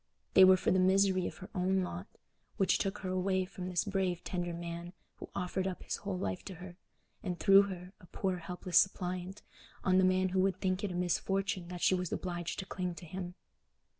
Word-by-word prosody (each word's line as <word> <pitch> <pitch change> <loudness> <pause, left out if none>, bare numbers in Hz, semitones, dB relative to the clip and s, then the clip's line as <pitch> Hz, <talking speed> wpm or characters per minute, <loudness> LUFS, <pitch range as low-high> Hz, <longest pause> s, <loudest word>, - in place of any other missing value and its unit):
They 190 - +9
were 185 0 +8
for - - +1
the 185 - +4
misery 190 0 +3
of - - -7
her 185 - -10
own 190 +1 +1
lot, 180 +2 -5 0.5
which 195 - +3
took 195 +1 -1
her - - -1
away 185 0 +1
from 180 -1 -7
this 175 -2 +1
brave 190 -3 -1
tender 175 -1 -2
man 170 +1 -6 0.2
who - - -9
offered 185 +1 -1
up 185 - -5
his - - -3
whole 195 -2 -4
life 180 -1 -3
to 190 - -7
her, 180 +1 -10 0.5
and 180 -3 -3
threw 195 0 +8
her, 180 0 -8
a 180 - -16
poor 185 +2 -2
helpless 180 +1 +1
suppliant, 185 0 -1 0.4
on 185 0 +4
the - - +4
man 185 0 +3
who 185 +1 0
would 185 -1 +2
think 185 +2 0
it 200 - -1
a - - -4
misfortune 190 +2 0
that 175 0 -7
she - - +4
was 180 -2 -1
obliged 175 -2 -3
to 190 - -4
cling 180 -2 -3
to 175 - -10
him. 180 +1 -6
185 Hz, 215 wpm, -33 LUFS, 180-190 Hz, 0.5 s, They